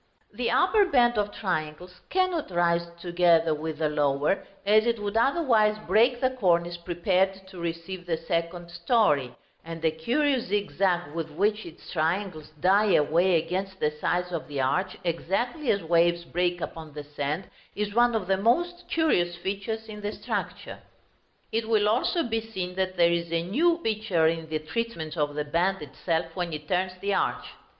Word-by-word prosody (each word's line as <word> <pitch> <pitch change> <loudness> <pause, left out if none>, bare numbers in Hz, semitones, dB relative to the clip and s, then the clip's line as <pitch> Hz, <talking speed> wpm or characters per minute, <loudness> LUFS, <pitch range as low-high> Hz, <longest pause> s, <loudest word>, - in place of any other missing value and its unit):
The - - -1
upper 425 -3 +4
band 240 - +3
of 205 0 -1
triangles 180 -2 -4
cannot 370 - 0
rise 170 -1 +1
together 170 -2 +3
with 155 +1 -4
the 155 0 +1
lower, 145 +3 0 0.2
as 215 +3 +4
it 235 -1 +1
would 205 0 -4
otherwise 230 -5 +3
break 240 +3 +3
the 255 0 +2
cornice 175 -8 +1
prepared 185 +2 0
to 185 -2 -11
receive 170 +2 -5
the 165 -2 0
second 170 +1 -3
story; 170 - +1 0.3
and 165 0 -7
the 160 -1 +1
curious 250 - 0
zigzag 190 -5 0
with 165 -1 -4
which 205 +6 0
its 165 - -12
triangles 165 -1 -1
die 200 +4 +4
away 170 +5 +3
against 190 +4 -3
the 150 - +1
sides 175 +4 -1
of 170 -3 -4
the 145 -2 -5
arch, 180 +9 0
exactly 215 - -1
as 200 -3 +2
waves 170 +1 +2
break 175 +1 -1
upon 160 -2 -7
the 150 - -6
sand, 145 +4 -3 0.3
is 205 0 -2
one 240 +1 +4
of 215 -4 -1
the 190 +1 +1
most 345 - +1
curious 175 - +1
features 200 +5 -4
in 210 -1 -8
the 205 0 -2
structure. - - -5 0.7
It 225 0 -1
will 220 -2 +4
be - - +3
also 250 - +1
seen 225 -5 -3
that 185 0 -2
there 170 -1 +5
is 170 -1 -1
a 165 0 0
new 320 - +2
feature 210 -7 +1
in 165 0 0
the 155 - 0
treatment 160 -1 -4
of 145 -2 -1
the 150 0 -2
band 175 +4 0
itself 165 +4 -2
when 175 -3 -3
it 150 -1 -6
turns 185 0 0
the 200 0 0
arch. - - 0
180 Hz, 175 wpm, -27 LUFS, 165-215 Hz, 0.7 s, there